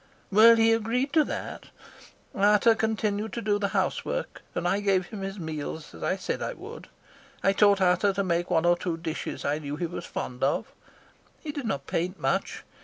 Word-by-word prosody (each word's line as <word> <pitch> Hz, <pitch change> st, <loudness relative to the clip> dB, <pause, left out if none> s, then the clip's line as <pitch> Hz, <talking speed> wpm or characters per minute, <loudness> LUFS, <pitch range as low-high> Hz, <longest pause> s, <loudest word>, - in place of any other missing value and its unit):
"Well, 225 Hz, +3 st, +8 dB
he 225 Hz, 0 st, +4 dB
agreed 235 Hz, +5 st, 0 dB
to 315 Hz, -2 st, +5 dB
that. -, -, -5 dB, 0.7 s
Ata 210 Hz, +3 st, +5 dB
continued 220 Hz, -1 st, -1 dB
to 235 Hz, -, -3 dB
do 205 Hz, 0 st, +1 dB
the 200 Hz, -, +1 dB
housework, 205 Hz, -, -2 dB
and -, -, -1 dB
I 200 Hz, -, +1 dB
gave 195 Hz, -3 st, +2 dB
him 205 Hz, +2 st, -8 dB
his 195 Hz, +1 st, -5 dB
meals 160 Hz, -2 st, -6 dB
as 80 Hz, -, -12 dB
I -, -, 0 dB
said -, -, -4 dB
I -, -, -2 dB
would. -, -, -10 dB, 0.6 s
I 195 Hz, -, +4 dB
taught 200 Hz, -1 st, +4 dB
Ata 185 Hz, +2 st, +3 dB
to 200 Hz, +1 st, 0 dB
make 175 Hz, -1 st, 0 dB
one 165 Hz, 0 st, +2 dB
or 175 Hz, 0 st, +5 dB
two 175 Hz, -1 st, -3 dB
dishes 165 Hz, -1 st, -5 dB
I 145 Hz, +2 st, 0 dB
knew 145 Hz, -1 st, -5 dB
he 170 Hz, +3 st, -2 dB
was 170 Hz, -, -6 dB
fond 125 Hz, 0 st, -5 dB
of. 135 Hz, -, 0 dB, 0.7 s
He 305 Hz, -, -5 dB
did 285 Hz, -5 st, -5 dB
not 140 Hz, -9 st, -2 dB
paint 180 Hz, +3 st, -2 dB
much. -, -, -1 dB
195 Hz, 195 wpm, -27 LUFS, 170-220 Hz, 0.7 s, Well